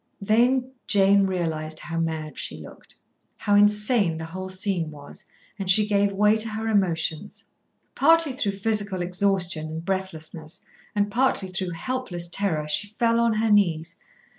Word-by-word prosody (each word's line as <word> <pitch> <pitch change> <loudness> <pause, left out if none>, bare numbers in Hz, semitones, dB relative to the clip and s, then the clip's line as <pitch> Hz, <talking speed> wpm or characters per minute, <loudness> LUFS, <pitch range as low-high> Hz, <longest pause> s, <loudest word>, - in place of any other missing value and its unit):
Then 250 +5 +2 0.2
Jane 200 -1 +4
realised 160 -4 -2
how 165 -1 -4
mad 160 -2 -3
she - - -4
looked, - - -14 0.4
how 205 - -1
insane 205 -3 +3
the 160 - -5
whole 185 +3 -7
scene 185 -4 -1
was, 145 -2 -11 0.4
and 195 -1 -3
she 210 +3 +6
gave 205 -1 +1
way 210 +2 +3
to 220 +1 -1
her 220 +1 -4
emotions. 185 -3 -1 0.5
Partly 325 -1 +3
through 235 -7 -1
physical 200 -2 -1
exhaustion 180 -3 0
and 160 +1 -7
breathlessness, 165 -4 -5 0.3
and 205 0 0
partly 235 -5 +1
through 185 -1 -3
helpless 180 -3 -3
terror, 170 -5 -1
she 205 +8 -2
fell 230 0 +2
on 235 -1 +2
her 220 0 0
knees. 170 -5 +2
195 Hz, 150 wpm, -24 LUFS, 165-215 Hz, 0.5 s, she